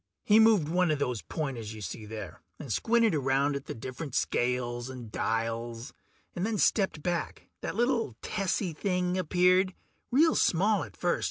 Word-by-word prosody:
He 215 +1 +5
moved 220 -8 +5
one 180 +2 +2
of 155 - +2
those 125 -6 -2
pointers 115 - -4
you 110 - -9
see 105 +3 -6
there, 105 -3 -8 0.2
and 135 -7 -4
squinted 230 - +3
around 140 0 +1
at 140 - -5
the - - -5
different 130 +4 -6
scales 120 0 0
and 125 -4 -8
dials, 115 +3 -2 0.4
and 175 - -2
then 220 +1 0
stepped 190 -7 +1
back. 175 -1 -3
That - - -4
little 235 - +1
tessy 195 -3 -1
thing 180 +1 -1
appeared, 185 +1 +3 0.3
real 315 +6 +4
small 200 +4 +2
at - - -11
first. 175 -1 +1
155 Hz, 165 wpm, -29 LUFS, 120-190 Hz, 0.4 s, He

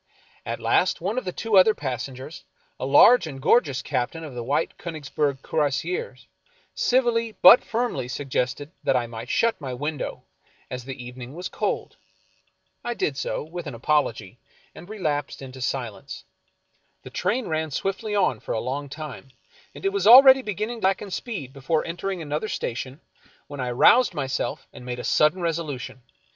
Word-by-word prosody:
At - - -3
last 180 - +2
one 200 +8 -1
of 255 - -12
the 180 - -2
two 220 +2 +1
other 210 +3 +6
passengers, 130 - -6 0.4
a 130 - -2
large 165 - +7
and 135 -3 -7
gorgeous 140 - +2
captain 140 +4 -2
of 150 -4 -8
the 120 -1 -5
White 140 +6 -1
Konigsberg 145 -4 -3
Cuirassiers, 160 - -2 0.5
civilly 235 -3 +1
but 245 - +10
firmly 230 - -2
suggested 135 +2 -3
that - - +2
I 125 -1 +1
might 115 -1 -8
shut 230 -6 +1
my 130 -3 -4
window, 145 +3 -4 0.5
as 125 -1 -5
the 130 -2 -7
evening 125 +2 -9
was 180 +2 -5
cold. - - -3 0.9
I 240 0 -3
did 145 - -1
so, 135 - -3
with 170 +1 -7
an 135 - -6
apology, 120 -5 -1 0.3
and 175 - -12
relapsed 155 -9 -2
into 130 -1 -9
silence. 120 -3 -4 0.8
The - - -10
train 245 +3 -1
ran 160 -1 -1
swiftly 195 +7 -3
on 180 - +2
for - - -5
a - - 0
long 140 +4 -4
time, 150 -2 -8 0.5
and - - -9
it 390 - +1
was 400 - +1
already 265 +3 +10
beginning 215 +1 -4
to - - -1
slacken 195 +1 0
speed 180 - -5
before 150 +3 -1
entering 175 +1 -4
another 150 +7 -3
station, 130 +5 -4 0.4
when 145 -1 -9
I 125 -1 -2
roused 185 - +5
myself 135 -3 -3
and - - -11
made 125 0 -5
a 125 - -6
sudden 160 +4 +2
resolution. 155 -6 -3
150 Hz, 165 wpm, -24 LUFS, 130-195 Hz, 0.9 s, but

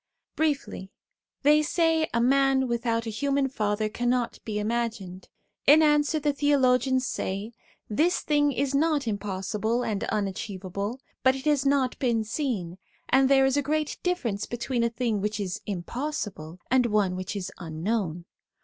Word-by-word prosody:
Briefly, 275 -11 -1 0.5
they 300 +2 +6
say 320 0 +1
a 235 - +1
man 270 +1 +3
without 235 -1 -1
a 225 - -3
human 275 +4 0
father 215 -4 -1
can 240 +3 -2
not 245 -1 0
be 215 -2 -3
imagined. 215 -4 -3 0.4
In 310 +2 +8
answer 295 +1 +3
the 295 -1 0
theologians 260 -2 +2
say: 200 +1 -3 0.2
' - - -34
This 315 +12 +1
thing 290 -1 +2
is 280 +1 -1
not 295 -2 +1
impossible 210 +3 -2
and 210 -4 -2
unachievable, 200 +2 -3 0.2
but 260 0 +4
it 270 +1 -7
has 290 -2 +2
not 275 -2 +1
been 235 -4 +1
seen; 210 - -3 0.3
and 265 +1 +4
there 270 -1 +5
is 270 +1 +2
a - - +3
great 305 +2 -2
difference 240 - -1
between 240 0 -2
a 235 - +2
thing 230 -3 -1
which 210 +1 -2
is 185 -3 -3
impossible 200 - -4
and 255 -2 +4
one 205 -4 +1
which 185 +2 -5
is 195 -3 -4
unknown. 170 +1 -3
240 Hz, 160 wpm, -26 LUFS, 210-280 Hz, 0.5 s, In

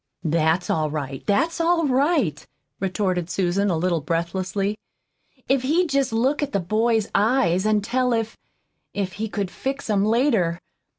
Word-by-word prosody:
"That's 160 +2 +1
all 155 -1 0
right 140 -3 -5
that's 325 +12 +1
all 335 -1 +2
right," 270 - +1 0.4
retorted 185 -2 -1
Susan, 195 +2 0
a 170 - +1
little 170 -1 0
breathlessly. 185 +6 -2 0.7
"If 270 -1 +2
he'd 320 +7 +1
jest 275 -2 +1
look 260 +7 +1
at 285 -1 -2
the 200 - +2
boy's 220 +4 +1
eyes 205 -4 +2
an' 215 -1 +2
tell 250 +4 0
if 225 -1 -1 0.6
if 195 -2 -2
he 220 - -2
could 200 -3 -3
fix 270 -3 -4
'em 200 -1 +2
later. 215 -7 +2
205 Hz, 155 wpm, -23 LUFS, 175-255 Hz, 0.7 s, all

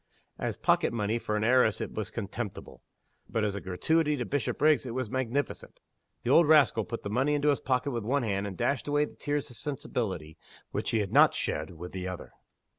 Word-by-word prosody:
As - - -2
pocket - - +2
money 115 0 -1
for 105 - -2
an 105 - -1
heiress 120 -2 +4
it - - -4
was 110 -1 -3
contemptible. 110 -1 -6 0.5
But 110 - 0
as 105 -2 0
a 100 - -5
gratuity 150 - +1
to 120 - -2
Bishopriggs 145 +1 +1
it 120 - -5
was 130 -4 -3
magnificent. 130 +1 -2 0.4
The 120 - 0
old 165 +2 +6
rascal 135 -8 +5
put 115 0 -6
the 100 - -4
money 135 +6 +2
into 145 0 +2
his 140 - +2
pocket 130 +2 0
with 120 -3 -3
one 135 +5 +1
hand, 100 -2 -1
and 95 -3 -7
dashed 140 - 0
away 145 0 +2
the - - -13
tears 145 -1 -2
of 120 - -13
sensibility, 95 - -4 0.3
which - - -2
he 115 - +2
had 100 - -3
not - - +6
shed, 80 +4 -3
with 90 +2 -7
the 95 -1 -4
other. 90 -1 -7
120 Hz, 210 wpm, -29 LUFS, 105-140 Hz, 0.5 s, old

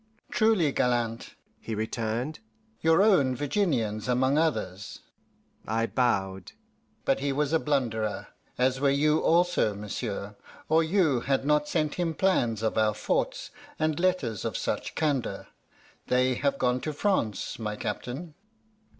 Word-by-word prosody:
"Truly 215 -9 +3
gallant," 120 -3 -1 0.2
he 110 - -5
returned 115 +6 -3 0.4
"your 165 +4 +4
own 145 -12 +4
Virginians 130 - -1
among 130 +2 +2
others" 105 - -1 0.7
(I 115 +2 +1
bowed); 95 -7 -1 0.5
"but - - +2
he 140 +1 -1
was 145 +2 0
a 160 - +4
blunderer, 115 -8 -1 0.3
as 130 +1 +2
were 140 0 +3
you 150 +3 +3
also, 170 - +2
monsieur, 105 0 -5 0.3
or 160 +1 +4
you 160 -6 +2
had 135 +2 0
not 150 0 +2
sent 155 -3 0
him 165 -2 -1
plans 120 - +1
of 110 - +1
our 105 -1 +2
forts 105 - -1 0.3
and 155 0 0
letters 170 - 0
of - - -2
such - - -3
candour. 145 -5 -1 0.6
They 130 +1 +3
have 140 +2 0
gone 125 -1 +1
to 155 - -3
France, 140 - -1
my 105 -1 -3
captain." 125 +10 -5
130 Hz, 135 wpm, -27 LUFS, 115-155 Hz, 0.7 s, your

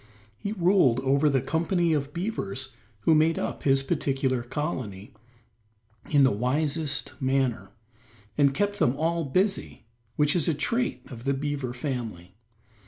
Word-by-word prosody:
He 205 - -4
ruled 175 - +3
over 140 +3 +3
the 135 -2 +2
company 170 +2 +1
of 145 -1 -1
beavers 135 - -4 0.3
who 160 - +4
made 155 +1 +3
up - - -3
his 135 -1 +3
particular 135 -2 0
colony 120 - -4 1.0
in 145 -2 +5
the 130 - +5
wisest 145 +6 -1
manner, 130 -7 0 0.7
and 140 -2 +4
kept 205 +1 0
them 125 - +3
all 165 +2 0
busy, 190 - -1 0.3
which 150 +1 +2
is 170 - +1
a 165 - +2
trait 240 - -1
of 120 0 -9
the 140 0 +1
beaver 140 -2 -3
family. 120 - -5
140 Hz, 140 wpm, -27 LUFS, 130-165 Hz, 1.0 s, in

